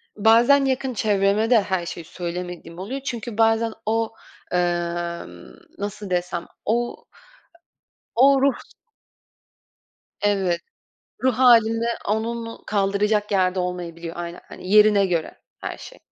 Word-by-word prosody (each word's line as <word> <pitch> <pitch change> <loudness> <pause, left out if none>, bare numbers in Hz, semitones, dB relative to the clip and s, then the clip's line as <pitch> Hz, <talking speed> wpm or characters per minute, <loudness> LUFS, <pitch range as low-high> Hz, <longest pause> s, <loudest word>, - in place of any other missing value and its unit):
bazen 235 +6 +5
yakın 265 -1 -1
çevreme 205 0 +2
de 230 -4 +6
her 190 -3 -2
şeyi 170 -1 -6
söylemediğim 175 0 -6
oluyor 250 +9 -5
çünkü 235 -4 -5
bazen 225 0 +3
o, 225 +1 0 0.4
eee, 180 - +3 1.2
nasıl 205 0 -5
desem 180 -1 -2 0.2
o, 240 +2 0 1.2
o 270 +2 +5
ruh 275 0 +4 1.7
evet, 195 -4 +1 0.6
ruh 260 -1 +3
halinde 230 -2 +5 0.2
onun 230 +2 -3
kaldıracak 205 +1 +1
yerde 185 -1 +2
olmayabiliyor 170 -2 -5
aynen. 175 0 -6
Hani 185 - -9
yerine 210 -1 +6
göre 170 -3 -2 0.2
her - - -5
şey. - - -12
210 Hz, 110 wpm, -23 LUFS, 180-230 Hz, 1.7 s, de